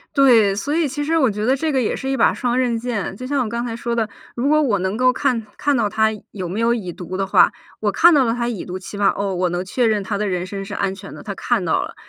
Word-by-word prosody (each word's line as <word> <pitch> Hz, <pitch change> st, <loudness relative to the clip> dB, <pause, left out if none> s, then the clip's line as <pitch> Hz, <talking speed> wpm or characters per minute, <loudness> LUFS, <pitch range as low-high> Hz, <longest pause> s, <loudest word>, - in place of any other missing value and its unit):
对， 235 Hz, -8 st, +5 dB
所 285 Hz, +8 st, -2 dB
以 325 Hz, -1 st, +2 dB
其 290 Hz, +2 st, -3 dB
实 325 Hz, +3 st, +1 dB
我 270 Hz, -6 st, +4 dB
觉 210 Hz, 0 st, -3 dB
得 260 Hz, +3 st, +2 dB
这 310 Hz, +2 st, -1 dB
个 265 Hz, -, +2 dB
也 225 Hz, -, 0 dB
是 265 Hz, -, -4 dB
一 270 Hz, -, 0 dB
把 -, -, +3 dB
双 245 Hz, -1 st, -1 dB
刃 245 Hz, -3 st, +1 dB
剑。 230 Hz, -6 st, -3 dB
就 255 Hz, -, -6 dB
像 280 Hz, -1 st, +1 dB
我 225 Hz, -, -4 dB
刚 235 Hz, +2 st, -3 dB
才 230 Hz, -2 st, -4 dB
说 235 Hz, 0 st, -3 dB
的， 225 Hz, -2 st, 0 dB, 0.3 s
如 245 Hz, +3 st, -1 dB
果 305 Hz, +1 st, +4 dB
我 230 Hz, -9 st, +1 dB
能 190 Hz, +2 st, -1 dB
够 255 Hz, +2 st, +4 dB
看 250 Hz, -4 st, -1 dB
看 290 Hz, -1 st, +1 dB
到 225 Hz, -4 st, +1 dB
他 220 Hz, +1 st, +2 dB, 0.2 s
有 185 Hz, -3 st, -5 dB
没 195 Hz, +6 st, -3 dB
有 230 Hz, +1 st, +3 dB
已 190 Hz, -7 st, -4 dB
读 185 Hz, +1 st, -6 dB
的 195 Hz, 0 st, -1 dB
话， -, -, +5 dB, 0.3 s
我 210 Hz, -1 st, +1 dB
看 340 Hz, -, +6 dB
到 285 Hz, -3 st, +5 dB
了 230 Hz, -, +1 dB
他 235 Hz, 0 st, -2 dB
已 230 Hz, -6 st, -4 dB
读， 185 Hz, +1 st, -6 dB
起 190 Hz, -, -9 dB
码 200 Hz, -1 st, +3 dB
哦， 200 Hz, -1 st, -2 dB
我 180 Hz, 0 st, 0 dB
能 175 Hz, +2 st, -3 dB
确 240 Hz, +7 st, 0 dB
认 215 Hz, -2 st, +2 dB
他 200 Hz, +1 st, -3 dB
的 210 Hz, -, -1 dB
人 180 Hz, -2 st, -2 dB
身 195 Hz, +1 st, -5 dB
是 195 Hz, -, -8 dB
安 195 Hz, -1 st, -1 dB
全 195 Hz, 0 st, -10 dB
的， -, -, -10 dB
他 200 Hz, -, -6 dB
看 220 Hz, -2 st, 0 dB
到 160 Hz, -, +1 dB
了。 -, -, -8 dB
225 Hz, 330 characters per minute, -20 LUFS, 195-255 Hz, 0.3 s, 看